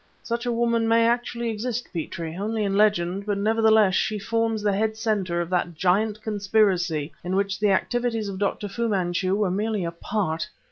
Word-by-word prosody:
"Such 235 +1 -3
a - - +1
woman 235 -1 +1
may 230 0 +4
actually 235 0 -1
exist, 235 +2 -3
Petrie, 165 -1 -4
only 215 +3 -2
in 195 -1 0
legend; 200 -2 +2
but, 205 -1 0
nevertheless, 220 -1 +4
she 215 +3 +1
forms 225 +1 -1
the 205 -1 +2
head 220 +2 0
center 205 -6 -1
of 170 - -4
that 175 -2 0
giant 210 +5 +1
conspiracy 195 -7 +1
in 180 +1 -2
which 200 0 0
the 210 -1 +2
activities 230 +2 0
of 195 -1 -5
Dr. 205 +1 -1
Fu 230 +3 -2
Manchu 185 -1 0
were 205 -3 +1
merely 210 0 -1
a 170 - -2
part. 170 -1 -2
210 Hz, 185 wpm, -24 LUFS, 185-225 Hz, -, may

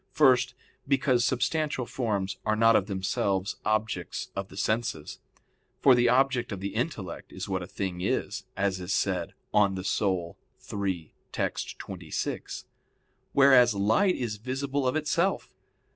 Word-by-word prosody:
First, 130 -4 +4 0.3
because 130 -3 +3
substantial 140 +1 0
forms 100 -7 -2
are 110 0 +1
not 115 +1 +5
of 95 - +2
themselves 95 0 -1
objects 110 -4 -2
of 95 0 -3
the 95 - -13
senses; 110 - -2 0.6
for 135 - +6
the 120 -1 +4
object 130 -1 +2
of 100 - -4
the 100 +1 -4
intellect 110 - -4
is - - -6
what 95 -1 -1
a 90 - -6
thing 95 -2 -4
is, 95 - -1
as 100 -2 0
is 90 +1 -5
said - - 0 0.2
De - - +5
Anima 95 -2 +2 0.9
iii, 95 -5 -2 0.2
text. - - -3
26: 90 -5 -5 0.7
whereas 130 -5 +6
light 110 - +3
is 115 -4 -3
visible 135 +4 -2
of 125 - +1
itself. 165 +5 0
110 Hz, 140 wpm, -28 LUFS, 95-130 Hz, 0.9 s, for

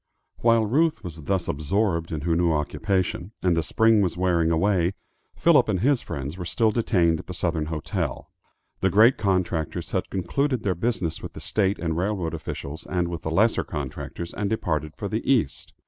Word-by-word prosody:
While 115 -1 +4
Ruth 155 +9 +1
was 80 -3 -7
thus 95 -3 0
absorbed 85 +3 0
in 80 -2 -3
her 85 +2 +1
new 85 0 +2
occupation, 95 +5 -1
and 90 -2 +3
the 80 - +2
spring 110 +6 +3
was 90 -3 0
wearing 85 -3 +2
away, 90 +1 +2 0.4
Philip 145 -9 +4
and 95 -4 0
his 135 +1 +3
friends 70 +6 -5
were - - -3
still 110 +6 +1
detained 90 -8 +2
at - - -10
the 90 - -6
Southern 85 -3 -1
Hotel. 80 -2 -3 0.5
The 95 - +2
great 110 +6 +5
contractors 90 -6 -1
had - - -1
concluded 130 +6 -1
their 95 - +1
business 90 -4 -2
with - - -7
the - - -8
state 100 -1 0
and 80 -2 -2
railroad 90 -2 -1
officials 80 -1 -6
and 90 -2 -1
with 85 -1 -5
the - - -3
lesser 105 +8 +3
contractors, 75 +3 -6
and 100 -1 -2
departed 80 -8 -2
for 100 - -4
the 110 +3 -2
East. 110 - 0
90 Hz, 185 wpm, -25 LUFS, 80-110 Hz, 0.5 s, great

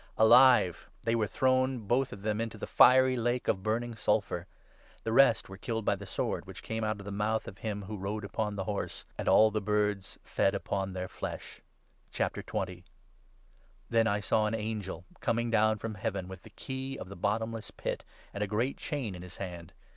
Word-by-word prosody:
Alive, 120 -4 +6
they 115 0 +1
were 110 -2 +1
thrown, 130 -1 +1
both 125 +5 +1
of 100 - -9
them, 105 +1 0
into 115 -1 -4
the - - -5
fiery 130 0 +6
lake 120 +1 0
'of 95 - +1
burning 115 +3 -1
sulphur.' 110 - 0 0.6
The 110 - -1
rest 125 -4 +5
were 95 - -9
21 - - -31
killed 115 -2 -2
by - - +3
the 100 0 -9
sword - - -2
which 95 0 -9
came 110 0 -3
out 110 -1 -1
of 100 - -9
the 100 - -5
mouth 105 +2 -1
of 95 - -9
him 105 -2 -3
who 105 +1 -6
rode 105 +3 -3
upon 105 +1 -2
the 95 - -2
horse; 100 +1 -4
and - - -5
all 110 0 +6
the 110 0 -1
birds 105 -1 0
feJ - - +2
upon 95 -1 -2
their 95 0 -3
flesh. - - -6 2.3
Then 115 -1 +4
I 105 0 +1
saw 105 +1 +2
an 110 - -1
angel 105 -4 -4
coming 115 0 0
down 110 -1 +4
from 110 +1 -4
Heaven, 95 -2 -3
with 95 +1 -9
the - - -13
i - - -30
key 130 0 -5
of - - -7
the 100 - -9
bottomless 110 +3 -2
pit - - -4 0.3
and 100 - -1
a - - -1
great 115 +6 0
chain 135 -9 -3
in 90 - -8
his 90 -1 -10
hand. 85 -3 -6
110 Hz, 200 wpm, -31 LUFS, 100-115 Hz, 2.3 s, Alive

